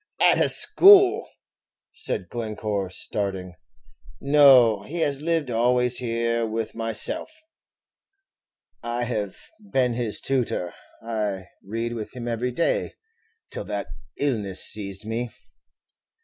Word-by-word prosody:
"At - - +4
a - - +3
school!" 395 +1 +6 0.6
said - - -3
Glencore, 105 -4 -4
starting; 95 -1 -4 0.7
"no, 135 -7 +6
he 165 +11 -5
has 140 -2 +1
lived 160 -4 0
always 125 +1 +2
here 115 -1 -1
with 110 0 -3
myself. 115 - -1 1.5
I 120 +1 -3
have 105 -5 -3 0.4
been 125 -2 +2
his 115 -3 -2
tutor; 125 -9 -2 0.3
I 105 -4 -3 0.2
read 115 +3 -4
with 110 -3 -7
him 120 -1 -6
every 120 +2 -2
day, 165 +7 -1 0.6
till - - -6
that 100 -7 -4 0.3
illness 105 -10 0
seized 100 -1 -1
me." 115 +2 -3
115 Hz, 110 wpm, -24 LUFS, 105-125 Hz, 1.5 s, school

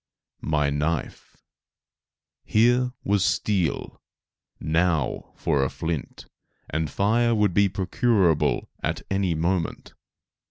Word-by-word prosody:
My 75 -2 +2
knife! 75 +2 -3 1.1
Here 120 +3 +3
was 100 -1 +2
steel; 95 -8 -1 0.6
now 80 -3 0
for 70 -2 +1
a 65 - 0
flint, 80 -3 -5 0.5
and 75 0 -1
fire 115 - +2
would 105 -4 +2
be 100 +2 +4
procurable 95 - +1
at - - -2
any 95 -3 +1
moment. 85 +1 -2
90 Hz, 95 wpm, -25 LUFS, 80-105 Hz, 1.1 s, be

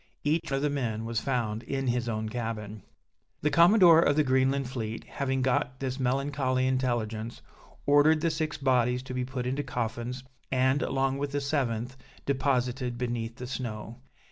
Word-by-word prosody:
Each 155 +3 0
of 135 +1 0
the 150 - +2
men 115 -6 -2
was 115 -1 -1
found 115 -5 -1
in 135 +2 -3
his 120 -1 0
own 110 -1 -2
cabin. 110 -2 -4 0.6
The 150 - +1
Commodore 170 -1 +7
of 145 - +3
the 155 - +4
Greenland 130 0 +2
fleet 115 -3 -4
having 130 -2 -2
got 130 +1 0
this 130 0 -3
melancholy 130 0 0
intelligence, 120 -4 -1 0.4
ordered 145 +2 +5
the 165 0 +2
six 155 -1 -2
bodies 125 -2 +2
to 130 - -7
be 125 0 -1
put 125 -1 -4
into 130 +3 -1
coffins, 120 0 -4 0.3
and, 130 +2 +2
along 135 0 0
with 140 0 -3
the 145 - +1
seventh, 130 -4 -1 0.3
deposited 125 -2 0
beneath 120 -2 -3
the 125 - -7
snow. 115 -3 -5
130 Hz, 165 wpm, -28 LUFS, 120-140 Hz, 0.6 s, Commodore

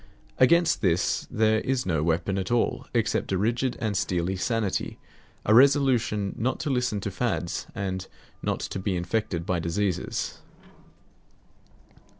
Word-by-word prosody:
Against 165 +4 +4
this 90 -2 +1
there 110 0 +2
is 130 -1 -1
no 80 -5 0
weapon 85 +4 0
at 95 - -3
all 120 -1 0
except - - 0
a - - +2
rigid 120 +5 0
and 110 -4 -1
steely 95 -1 0
sanity, 110 0 -1 0.5
a 110 - +4
resolution 125 -6 +4
not 125 +4 0
to 145 - -1
listen 125 -5 0
to 100 - -3
fads, 95 -5 -2
and 95 -1 -3 0.3
not - - -2
to - - -4
be 95 0 -1
infected 90 -1 -2
by 90 -1 0
diseases. 90 +3 -2
100 Hz, 140 wpm, -26 LUFS, 95-120 Hz, 0.5 s, Against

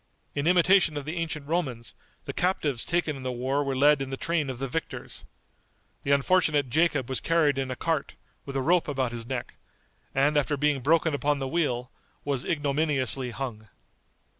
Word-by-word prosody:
In 145 +2 -1
imitation 180 -2 +4
of 145 - -5
the 160 +3 -4
ancient 155 -3 -3
Romans, 135 -9 -2 0.3
the - - -5
captives 155 -9 0
taken 170 -3 0
in 135 - -8
the 130 0 -3
war 130 +4 -1
were 135 -1 -2
led 145 +2 +4
in 135 - -3
the 135 - -4
train 165 -3 -1
of 130 - -4
the 135 +2 -3
victors. 165 +6 -5 0.8
The - - -5
unfortunate 145 -2 +3
Jacob 150 -3 +2
was 130 - -1
carried 155 -5 +2
in 135 -1 -2
a 130 - -3
cart, 160 +1 -2 0.3
with 140 - -8
a 135 - 0
rope 175 +3 +3
about 130 -4 -1
his 115 -1 -6
neck, 130 -2 -5 0.6
and 145 +3 +3
after 145 +1 -1
being 145 -1 +1
broken 160 +3 +3
upon 145 +1 +1
the 135 -1 -3
wheel 130 -6 -1 0.3
was 140 -3 -1
ignominiously 140 -4 +1
hung. 120 -4 -6
145 Hz, 185 wpm, -27 LUFS, 130-160 Hz, 0.8 s, imitation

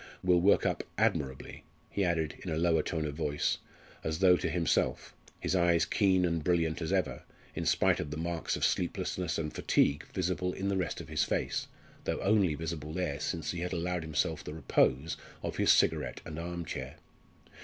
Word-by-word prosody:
"Will 90 -1 +4
work 100 +3 +4
up - - 0
admirably," 65 -2 -1 0.3
he 100 - 0
added 80 -4 0
in 95 - -6
a 80 - -1
lower 80 -1 +3
tone 80 -3 -2
of 75 - -3
voice, 75 -1 0 0.4
as 80 0 -1
though 90 0 +6
to 85 - -1
himself, 85 0 0 0.3
his - - -1
eyes 85 -2 +4
keen 95 -3 +3
and 85 -2 0
brilliant 85 -1 +1
as 80 - -2
ever, - - 0 0.3
in - - -3
spite - - +3
of 75 - -3
the 75 - -5
marks 85 0 -2
of - - +1
sleeplessness 90 -3 -1
and 75 -2 -3
fatigue 75 +2 +2
visible 90 0 -1
in 100 +1 -2
the 100 - +1
rest 90 -6 -2
of - - -8
the 80 - -9
face, - - 0 0.4
though - - -1
only 100 -6 +3
visible 80 -1 -4
there 80 -5 -2
since 80 0 -2
he 85 - -4
had 90 +2 -3
allowed 90 0 -1
himself 80 -3 -1
the 75 - -7
repose 80 -1 +1 0.3
of - - -3
his - - +5
cigarette - - +2
and 75 +1 -6
arm 85 0 -4
chair. 65 -3 -5
85 Hz, 190 wpm, -31 LUFS, 80-90 Hz, 0.4 s, though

